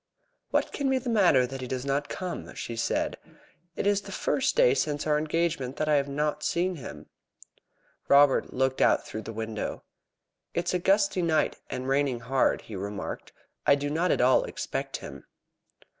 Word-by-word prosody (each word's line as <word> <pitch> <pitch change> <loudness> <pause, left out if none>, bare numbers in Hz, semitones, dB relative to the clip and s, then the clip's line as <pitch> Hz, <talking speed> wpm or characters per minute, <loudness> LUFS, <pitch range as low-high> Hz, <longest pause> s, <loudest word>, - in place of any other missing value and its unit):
"What - - +1
can 280 -2 0
be 265 - +3
the 250 -1 -3
matter 175 - +5
that 135 +1 -7
he 130 - -4
does 130 +1 -3
not 140 +1 -1
come?" 185 -1 -5
she 115 - -5
said. 115 - -1 0.6
"It - - -3
is 205 0 +3
the - - -10
first - - 0
day - - +5
since 145 -1 -1
our 150 -1 +2
engagement 155 -3 -1
that 155 - -2
I 155 - +3
have 140 0 0
not 150 +1 -1
seen 175 +3 0
him." 135 - -9 1.0
Robert 140 -1 +5
looked 130 0 0
out - - +4
through 110 - -6
the 115 - -7
window. 110 -1 -4 0.7
"It 170 - 0
is - - 0
a 180 - +1
gusty 195 0 +2
night, 160 -2 +1
and 130 0 -4
raining 135 -3 +1
hard," 130 +3 +1
he 110 - -9
remarked. 100 +1 -5 0.4
"I - - +7
do 145 0 -3
not 170 +4 +1
at - - +2
all 125 +1 +5
expect - - -4
him." - - -10
145 Hz, 185 wpm, -27 LUFS, 130-175 Hz, 1.0 s, I